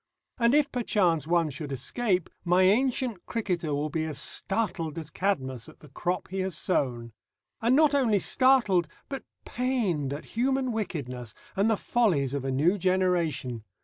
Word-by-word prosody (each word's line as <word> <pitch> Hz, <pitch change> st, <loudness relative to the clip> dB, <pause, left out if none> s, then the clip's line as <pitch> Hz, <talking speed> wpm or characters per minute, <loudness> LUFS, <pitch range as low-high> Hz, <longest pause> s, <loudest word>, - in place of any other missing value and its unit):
And 235 Hz, +3 st, +4 dB
if 295 Hz, -1 st, +3 dB
perchance 180 Hz, -, +1 dB
one 170 Hz, -2 st, +2 dB
should 140 Hz, +2 st, -6 dB
escape, 180 Hz, -, -1 dB
my 180 Hz, +1 st, +3 dB
ancient 235 Hz, 0 st, +2 dB
cricketer 180 Hz, -8 st, -2 dB
will 150 Hz, +1 st, -2 dB
be 160 Hz, -1 st, -1 dB
as 155 Hz, -3 st, -5 dB
startled 180 Hz, -6 st, -1 dB
as 160 Hz, -1 st, -6 dB
Cadmus 130 Hz, -, -2 dB
at -, -, -17 dB
the 150 Hz, -, -14 dB
crop 180 Hz, +6 st, -3 dB
he 190 Hz, +1 st, -4 dB
has 185 Hz, -4 st, -1 dB
sown. 120 Hz, -, -1 dB, 0.5 s
And 235 Hz, +3 st, +3 dB
not 300 Hz, 0 st, +5 dB
only 245 Hz, -7 st, +3 dB
startled 210 Hz, -7 st, +3 dB, 0.2 s
but 275 Hz, -1 st, -5 dB, 0.2 s
pained 220 Hz, -, -1 dB
at 145 Hz, +2 st, -5 dB
human 260 Hz, +2 st, +1 dB
wickedness 130 Hz, -, -4 dB, 0.2 s
and 200 Hz, +3 st, +2 dB
the 220 Hz, -, +2 dB
follies 170 Hz, -, +1 dB
of 140 Hz, -2 st, -2 dB
a 135 Hz, -, -2 dB
new 165 Hz, +10 st, +2 dB
generation. 170 Hz, -, 0 dB
180 Hz, 160 wpm, -27 LUFS, 150-230 Hz, 0.5 s, not